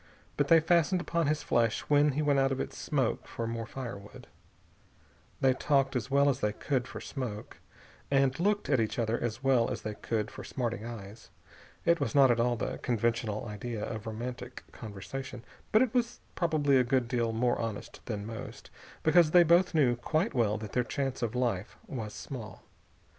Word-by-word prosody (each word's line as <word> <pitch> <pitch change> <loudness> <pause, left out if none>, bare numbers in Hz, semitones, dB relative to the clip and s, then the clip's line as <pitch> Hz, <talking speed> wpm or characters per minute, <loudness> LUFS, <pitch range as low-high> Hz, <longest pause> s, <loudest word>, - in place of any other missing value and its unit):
But - - +1
they 165 - +7
fastened 170 +2 +3
upon 170 -2 0
his 150 0 0
flesh 115 -2 +1
when 145 0 +3
he 150 +3 0
went 145 -2 +3
out 135 0 +3
of 135 - -1
its - - -4
smoke 135 -6 -1
for 115 - -4
more 115 0 -4 0.3
wood. 100 +1 -12 1.2
They 130 -1 +5
talked, 135 0 +1
as 125 +1 -2
well 140 +1 +4
as 135 -2 +2
they 105 -4 0
could 125 +1 -1
for - - -7
smoke, 115 -7 -6 0.5
and 135 0 +2
looked 205 +3 +1
at 140 -4 +3
each 110 -1 -1
other 115 -1 0
as 120 +2 -3
well 130 -4 +3
as - - -4
they 110 - -3
could 105 0 -2
for - - -8
smarting 120 -4 -3
eyes. 110 -2 -9 0.6
It 170 0 +4
was 140 - -2
not 135 -3 +7
at 120 - +1
all 120 +1 +2
the - - -3
conventional 115 -2 -1
idea 105 +1 -4
of 110 -1 -6
romantic 120 +3 -6
conversation, 120 +4 -7 0.3
but 215 +3 +6
it 250 - -2
was 240 -1 0
probably 155 -5 +2
a 130 - +5
good 125 0 +1
deal 120 -2 0
more 120 +2 +1
honest 115 -3 -5
than 105 -4 -3
most, 115 0 -8 0.3
because 160 0 +5
they 175 +2 +7
both 170 +2 +4
knew 130 -6 +4
quite 155 - 0
well 110 -5 +2
that 110 -1 -7
their 125 - +1
chance 135 0 -3
of 120 0 -2
life 115 -6 -1
was 110 -5 -5
small. 110 -8 -8
125 Hz, 190 wpm, -30 LUFS, 115-145 Hz, 1.2 s, they